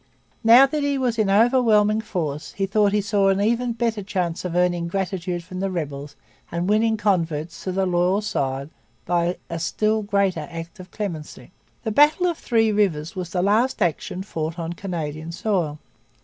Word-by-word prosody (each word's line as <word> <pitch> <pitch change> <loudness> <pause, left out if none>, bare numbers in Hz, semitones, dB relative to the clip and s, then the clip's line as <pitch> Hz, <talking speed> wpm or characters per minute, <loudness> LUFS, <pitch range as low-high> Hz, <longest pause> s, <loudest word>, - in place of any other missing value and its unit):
Now 235 +4 +8
that 295 +2 -2
he 285 -1 0
was 245 -3 -1
in 210 -2 +2
overwhelming 220 -1 +4
force 160 -9 -4
he 195 - -1
thought 205 +1 +2
he 210 0 +2
saw 200 -1 +2
an 195 0 +2
even 235 +3 +1
better 230 -2 -1
chance 180 -3 -2
of 180 -2 -4
earning 175 -1 +1
gratitude 180 -1 -3
from 185 +1 -8
rebels 145 -6 -4 0.4
and 170 +2 -2
winning 220 +2 +2
converts 170 -6 -1
to 185 - -1
the 190 +1 0
loyal 180 +2 +2
side 140 -7 -2 0.3
by 175 0 0
a 170 - -4
still 215 +6 0
greater 200 -6 0
act 170 +3 -8
of 185 0 -10
clemency. 175 -6 -6 0.3
The 220 - -2
battle 295 - +4
of 345 -3 0
Three 225 -2 +2
Rivers 190 -5 0
was 180 -2 -4
the 180 +1 -1
last 220 +6 +2
action 180 0 -1
fought 160 -4 -4
on 170 0 -4
Canadian 165 -4 -5
soil. 170 -5 -1
190 Hz, 175 wpm, -23 LUFS, 170-215 Hz, 0.4 s, Now